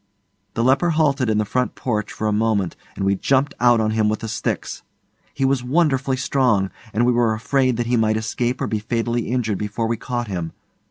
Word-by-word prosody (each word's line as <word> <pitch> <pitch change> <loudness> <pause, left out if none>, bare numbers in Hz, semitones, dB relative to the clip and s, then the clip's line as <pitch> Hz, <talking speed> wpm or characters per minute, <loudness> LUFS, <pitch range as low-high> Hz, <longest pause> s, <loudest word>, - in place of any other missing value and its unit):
The 115 - +1
leper 135 +7 +3
halted 140 -6 +2
in 110 - +2
the 105 - +1
front 125 +4 -1
porch 105 -4 -2
for 110 - -4
a 105 - +2
moment 105 -4 0 0.2
and 95 - -2
we 100 - +3
jumped 135 +8 +1
out 120 -1 +5
on 110 -1 +1
him 110 -1 +2
with 110 - -2
the 115 - -4
sticks. 110 - -3 0.5
He 135 - -1
was 135 -2 +1
wonderfully 135 -2 +1
strong, 125 -7 +1 0.2
and 115 +4 +1
we 125 - +4
were 120 -2 +2
afraid 130 +2 +1
that 120 - -1
he 120 +1 +1
might 110 -1 +2
escape 120 +3 -2
or - - +1
be 110 - -1
fatally 115 +1 -1
injured 115 -5 -1
before 105 +2 -2
we 115 +1 -1
caught 120 +1 -3
him. 85 -5 -4
115 Hz, 215 wpm, -21 LUFS, 110-130 Hz, 0.5 s, out